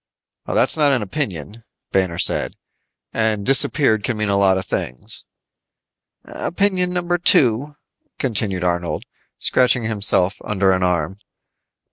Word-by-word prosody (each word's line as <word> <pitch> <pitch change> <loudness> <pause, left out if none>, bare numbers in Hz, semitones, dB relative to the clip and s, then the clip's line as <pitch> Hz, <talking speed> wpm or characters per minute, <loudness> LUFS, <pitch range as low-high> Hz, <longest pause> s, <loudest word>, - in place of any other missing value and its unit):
"That's - - +3
not 150 -3 +3
an 125 -5 0
opinion," 105 - -5 0.3
Banner 95 -3 0
said. - - 0 0.6
"And 110 -2 0
disappeared 130 -4 +2
can 110 +3 -2
mean 105 -1 -1
a 100 - +2
lot 95 -1 +3
of 95 - -4
things." 60 0 -6 1.0
"Opinion 185 -1 0
number 175 -1 -1
two," 140 -2 +3 0.4
continued 100 -7 -2
Arnold, 85 -1 -2 0.3
scratching 125 -1 +2
himself 100 -3 +1
under 95 -2 +1
an 95 0 0
arm. 90 +1 -1
105 Hz, 120 wpm, -19 LUFS, 95-135 Hz, 1.0 s, That's